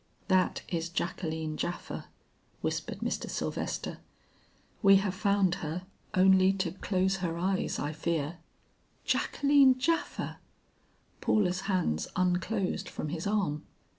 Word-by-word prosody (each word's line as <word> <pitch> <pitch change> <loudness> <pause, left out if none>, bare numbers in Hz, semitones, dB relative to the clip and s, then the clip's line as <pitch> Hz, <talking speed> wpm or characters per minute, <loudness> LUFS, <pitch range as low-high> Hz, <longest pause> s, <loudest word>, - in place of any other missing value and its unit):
"That 185 -1 +2
is 170 -1 -2
Jacqueline 160 -3 -2
Japha," 175 - -4 0.6
whispered - - -3
Mr. - - -2
Sylvester. - - -3 0.8
"We 195 -2 +8
have 195 -1 +2
found 200 -2 +2
her, 160 +3 -3 0.3
only 190 0 +6
to 190 -3 -1
close 190 +1 0
her 170 -3 -2
eyes, 185 +2 0
I 145 +2 -2
fear." 165 0 -2 0.7
"Jacqueline 280 -2 +4
Japha!" 330 +6 -1 0.8
Paula's 190 -3 +2
hands 180 - +1
unclosed 185 +2 0
from 155 - -4
his 165 +3 -3
arm. 190 -8 0
185 Hz, 110 wpm, -30 LUFS, 170-195 Hz, 0.8 s, We